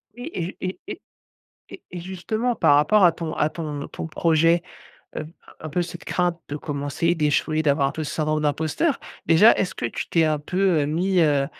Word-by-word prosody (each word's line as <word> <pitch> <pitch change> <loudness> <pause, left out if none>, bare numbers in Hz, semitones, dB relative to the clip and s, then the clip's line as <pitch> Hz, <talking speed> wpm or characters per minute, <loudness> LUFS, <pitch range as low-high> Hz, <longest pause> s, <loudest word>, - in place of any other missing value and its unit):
Oui 245 +5 -7
et 175 +2 -4
et 185 0 -4
et 385 - -7 0.7
et 375 - -11
et 180 - -6
justement 215 +7 -2
par 145 - +4
rapport 150 +8 +4
à 175 - +7
ton 165 -1 -5
à 150 - +1
ton 150 -3 -5
ton - - -6
projet, 165 +1 +2 0.5
heu, 155 - -4 0.3
un 155 - -6
peu 175 +4 0
cette 175 0 -8
crainte 175 -1 0
de 145 - -4
commencer, 145 +3 -1
d'échouer, 155 0 +1
d'avoir 140 -2 +2
un - - -6
peu 160 - -4
ce 150 - -5
syndrome 155 -1 0
d'imposteur. 155 - 0 0.3
Déjà 170 +8 +7
est-ce 190 - -2
que - - -3
tu 115 - -5
t'es 165 -1 +3
un 155 -1 +1
peu, 180 +2 +1
heu, - - 0
mis, 180 +5 +1
heu 145 -4 +3
160 Hz, 200 wpm, -23 LUFS, 150-180 Hz, 0.7 s, à